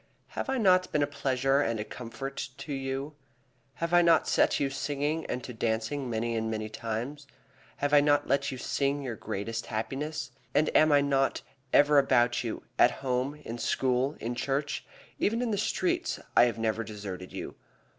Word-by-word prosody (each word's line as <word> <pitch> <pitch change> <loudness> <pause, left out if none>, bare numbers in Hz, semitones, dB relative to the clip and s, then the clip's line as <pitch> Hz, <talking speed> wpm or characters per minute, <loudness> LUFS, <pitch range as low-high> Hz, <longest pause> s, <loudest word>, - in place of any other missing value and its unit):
"Have - - -4
I 265 - +1
not 185 -5 +4
been 150 - +2
a - - +4
pleasure 135 -1 +1
and 115 -5 0
a - - -1
comfort 125 +3 -6
to 150 - -6
you? 135 +2 -3 0.6
Have 170 +5 -3
I 175 - +7
not 170 -2 +4
set - - +3
you 140 - +1
to - - -8
singing 145 +3 -1
and 125 - -3
to 125 - -7
dancing 115 +4 -1
many 115 0 -1
and 110 0 -1
many 110 -1 -3
times? 120 +7 -5 0.5
Have 145 +1 -1
I 145 - +8
not 145 0 +3
let 140 - +1
you 130 - -5
sing 140 +2 -1
your 125 -4 -4
greatest 115 +3 -4
happiness? 140 +6 -3 0.2
And 155 - +2
am 155 0 +6
I 145 -1 +6
not 135 -1 +1 0.3
ever 145 0 +6
about 120 -3 +3
you, 115 - -4 0.2
at - - +8 0.2
home, 130 +3 0
in 115 +1 -5
school, 130 +4 +1
in 120 +2 -3
church? 140 +4 -2 0.4
even 225 +3 +1
in 245 -2 0
the 205 - 0
streets 350 - 0 0.2
I - - +8
have 120 - -1
never 115 0 0
deserted 100 -4 -7
you. - - -6
135 Hz, 185 wpm, -29 LUFS, 115-145 Hz, 0.6 s, I